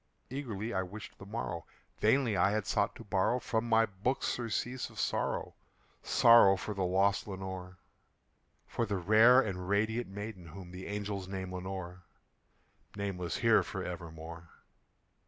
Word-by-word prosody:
Eagerly 120 Hz, -5 st, -4 dB
I 95 Hz, -, +1 dB
wished 100 Hz, +4 st, -9 dB
the 100 Hz, -, -10 dB
morrow; 100 Hz, -6 st, -4 dB, 0.3 s
vainly 115 Hz, 0 st, +3 dB
I 95 Hz, +1 st, +4 dB
had 105 Hz, 0 st, -1 dB
sought 100 Hz, +2 st, 0 dB
to -, -, -10 dB
borrow 100 Hz, +3 st, +1 dB
From 115 Hz, -2 st, -2 dB
my 115 Hz, 0 st, +5 dB
books 105 Hz, +6 st, -2 dB
surcease 120 Hz, +1 st, -2 dB
of -, -, -11 dB
sorrow -, -, -1 dB, 0.5 s
sorrow 115 Hz, -5 st, +6 dB
for 105 Hz, +2 st, -4 dB
the 100 Hz, -, -4 dB
lost 95 Hz, +3 st, +2 dB
Lenore 95 Hz, -1 st, -6 dB, 0.9 s
For 115 Hz, -, -2 dB
the 100 Hz, -2 st, -1 dB
rare 110 Hz, +7 st, +6 dB
and 95 Hz, -5 st, -4 dB
radiant 110 Hz, +4 st, +1 dB
maiden 100 Hz, -2 st, -7 dB
whom 90 Hz, +2 st, -10 dB
the 90 Hz, +1 st, -8 dB
angels 100 Hz, -2 st, -4 dB
name 95 Hz, -1 st, -5 dB
Lenore 90 Hz, -1 st, -6 dB, 0.9 s
Nameless 95 Hz, -4 st, -3 dB
here -, -, +5 dB
for -, -, -5 dB
evermore. 85 Hz, -1 st, -8 dB
100 Hz, 145 wpm, -32 LUFS, 90-110 Hz, 0.9 s, sorrow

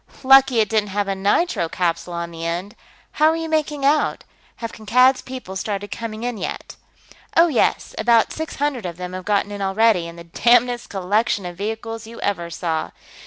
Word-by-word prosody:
"Lucky 270 Hz, -2 st, +6 dB
it 215 Hz, -, +1 dB
didn't 215 Hz, -2 st, +1 dB
have 200 Hz, +1 st, -1 dB
a 195 Hz, -, 0 dB
nitro 195 Hz, -, +1 dB
capsule 175 Hz, 0 st, -2 dB
on 170 Hz, 0 st, -4 dB
the 165 Hz, 0 st, -8 dB
end. 175 Hz, +6 st, -3 dB, 0.4 s
How 305 Hz, -, +3 dB
are 320 Hz, -, +1 dB
you 325 Hz, 0 st, -3 dB
making 300 Hz, -3 st, -1 dB
out? 295 Hz, +2 st, +2 dB, 0.3 s
Have 230 Hz, -1 st, -6 dB
Kankad's 250 Hz, +5 st, +3 dB
people 255 Hz, -7 st, -8 dB
started 205 Hz, +1 st, -4 dB
coming 225 Hz, -1 st, -5 dB
in, 245 Hz, -3 st, -3 dB
yet?" -, -, -5 dB, 0.6 s
"Oh, 335 Hz, +1 st, +6 dB
yes, 260 Hz, -, +1 dB
about 230 Hz, 0 st, +3 dB
six 315 Hz, 0 st, -5 dB
hundred 275 Hz, -8 st, -1 dB
of 170 Hz, -1 st, -7 dB
them 180 Hz, 0 st, -6 dB
have 185 Hz, 0 st, -6 dB
gotten 205 Hz, 0 st, +1 dB
in 205 Hz, -1 st, -6 dB
already, 195 Hz, -2 st, +2 dB
in 170 Hz, -, -9 dB
the 170 Hz, -, -10 dB
damnedest 240 Hz, +7 st, +2 dB
collection 200 Hz, +2 st, 0 dB
of 175 Hz, 0 st, -6 dB
vehicles 225 Hz, +3 st, -5 dB
you 230 Hz, +1 st, -10 dB
ever 175 Hz, -4 st, -2 dB
saw. 165 Hz, -2 st, -2 dB
215 Hz, 190 wpm, -21 LUFS, 185-245 Hz, 0.6 s, Lucky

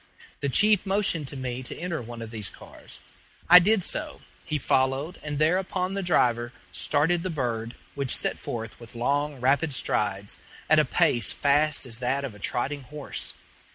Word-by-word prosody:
The 140 Hz, -, -1 dB
chief 210 Hz, +7 st, +4 dB
motioned 190 Hz, -6 st, +1 dB
to 140 Hz, -, -7 dB
me 125 Hz, -1 st, -4 dB
to 125 Hz, -, -5 dB
enter 170 Hz, -3 st, -3 dB
one 115 Hz, 0 st, -8 dB
of 110 Hz, -, -9 dB
these 105 Hz, -5 st, -2 dB
cars. -, -, -11 dB, 0.5 s
I 180 Hz, +1 st, +11 dB
did 200 Hz, +2 st, +3 dB
so. -, -, -2 dB, 0.2 s
He 150 Hz, -, -1 dB
followed, 135 Hz, +4 st, 0 dB
and 145 Hz, -1 st, -4 dB
thereupon 185 Hz, +4 st, +1 dB
the 195 Hz, -, -1 dB
driver 120 Hz, -9 st, +1 dB, 0.2 s
started 150 Hz, -, +1 dB
the 185 Hz, -, -3 dB
bird, 120 Hz, -6 st, -3 dB, 0.2 s
which 140 Hz, -2 st, 0 dB
set -, -, -1 dB
forth 115 Hz, -1 st, -6 dB
with 115 Hz, 0 st, -12 dB
long, 140 Hz, +4 st, -1 dB
rapid 140 Hz, +3 st, +2 dB
strides, 100 Hz, -3 st, -1 dB, 0.3 s
at -, -, +7 dB
a -, -, +4 dB
pace 115 Hz, -6 st, +2 dB
fast 145 Hz, +1 st, +2 dB
as 115 Hz, -2 st, -2 dB
that 130 Hz, +3 st, 0 dB
of 130 Hz, -, -6 dB
a 105 Hz, -, -14 dB
trotting 140 Hz, +7 st, -2 dB
horse. 150 Hz, +2 st, -4 dB
140 Hz, 175 wpm, -26 LUFS, 120-160 Hz, 0.5 s, I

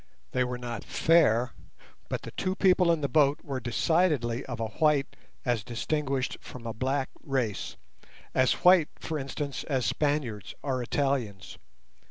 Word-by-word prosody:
They 125 Hz, -, +2 dB
were 125 Hz, 0 st, -3 dB
not 120 Hz, -3 st, -5 dB
fair, 125 Hz, -8 st, +3 dB, 0.6 s
but -, -, -3 dB
the -, -, -7 dB
two 185 Hz, 0 st, -2 dB
people 185 Hz, -3 st, +4 dB
in 165 Hz, -2 st, +1 dB
the 140 Hz, -, +1 dB
boat 145 Hz, +2 st, +3 dB
were 140 Hz, -5 st, -3 dB
decidedly 125 Hz, -, +1 dB
of 120 Hz, -3 st, -5 dB
a 115 Hz, -, 0 dB, 0.2 s
white 150 Hz, -3 st, +3 dB, 0.3 s
as 120 Hz, -4 st, +1 dB
distinguished 135 Hz, +3 st, -2 dB
from 125 Hz, -2 st, -10 dB
a 115 Hz, -, -3 dB
black 130 Hz, +4 st, -1 dB
race, 125 Hz, -8 st, -2 dB, 0.6 s
as 130 Hz, -1 st, +4 dB
white, 180 Hz, -4 st, +7 dB
for 155 Hz, -1 st, -4 dB
instance, 140 Hz, +1 st, -4 dB
as 130 Hz, -5 st, 0 dB
Spaniards 130 Hz, -4 st, -1 dB
or 130 Hz, -3 st, -1 dB
Italians. 120 Hz, -7 st, -2 dB
135 Hz, 150 wpm, -28 LUFS, 120-150 Hz, 0.6 s, white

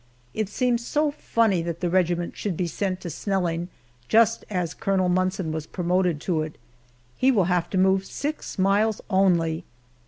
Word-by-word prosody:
It 215 Hz, -2 st, -2 dB
seems 240 Hz, +1 st, 0 dB
so 300 Hz, +4 st, +1 dB
funny 230 Hz, -, +1 dB
that 170 Hz, 0 st, -4 dB
the 180 Hz, -, -1 dB
regiment 175 Hz, -1 st, +1 dB
should 195 Hz, -6 st, -3 dB
be 180 Hz, -, 0 dB
sent 185 Hz, +2 st, -2 dB
to 175 Hz, -, -5 dB
Snelling 175 Hz, -1 st, -1 dB, 0.4 s
just 230 Hz, 0 st, +4 dB
as 180 Hz, -5 st, -2 dB
Colonel 190 Hz, -2 st, 0 dB
Munson 185 Hz, -1 st, 0 dB
was 160 Hz, 0 st, -4 dB
promoted 180 Hz, -2 st, 0 dB
to 165 Hz, -3 st, 0 dB
it. 155 Hz, 0 st, -6 dB, 0.6 s
He 260 Hz, -, +3 dB
will 220 Hz, -8 st, +4 dB
have 175 Hz, -1 st, 0 dB
to 190 Hz, -, -2 dB
move 190 Hz, +1 st, +3 dB
six 295 Hz, +2 st, -4 dB
miles 200 Hz, +3 st, +2 dB
only! 175 Hz, -4 st, +2 dB
185 Hz, 165 wpm, -25 LUFS, 170-205 Hz, 0.6 s, just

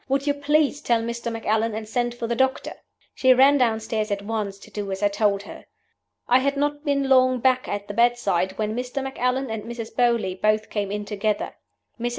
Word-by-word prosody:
Would 275 Hz, +1 st, +1 dB
you 290 Hz, -, +2 dB
please 290 Hz, 0 st, +1 dB
tell 230 Hz, -1 st, +1 dB
Mr. 235 Hz, 0 st, -4 dB
Macallan, 225 Hz, 0 st, 0 dB
and 220 Hz, 0 st, -5 dB
send 240 Hz, +1 st, -1 dB
for 240 Hz, -, -4 dB
the 235 Hz, +1 st, -1 dB
doctor?' 265 Hz, +2 st, 0 dB, 0.4 s
She 260 Hz, -1 st, +4 dB
ran 275 Hz, +3 st, +5 dB
downstairs 220 Hz, -2 st, 0 dB
at 200 Hz, -1 st, -2 dB
once 205 Hz, -2 st, -3 dB
to 200 Hz, -, -16 dB
do 205 Hz, -2 st, -4 dB
as 190 Hz, +1 st, -4 dB
I 205 Hz, -, +4 dB
told 200 Hz, -1 st, +1 dB
her. -, -, -11 dB, 0.6 s
"I 250 Hz, -, +5 dB
had 280 Hz, +1 st, 0 dB
not 290 Hz, +1 st, -1 dB
been 280 Hz, -2 st, 0 dB
long 255 Hz, -1 st, +4 dB
back 255 Hz, +1 st, +2 dB
at 205 Hz, 0 st, -4 dB
the 205 Hz, -, -5 dB
bedside 220 Hz, -6 st, +1 dB
when 215 Hz, 0 st, -2 dB
Mr. 250 Hz, +2 st, -3 dB
Macallan 260 Hz, -1 st, -1 dB
and 220 Hz, -1 st, -3 dB
Mrs. 230 Hz, -1 st, -7 dB
Beauly 235 Hz, -6 st, +2 dB
both 215 Hz, 0 st, +1 dB
came 205 Hz, -2 st, -2 dB
in 210 Hz, 0 st, -3 dB
together. 210 Hz, 0 st, -2 dB, 0.5 s
Mrs. 240 Hz, +1 st, -1 dB
235 Hz, 205 wpm, -24 LUFS, 210-260 Hz, 0.6 s, ran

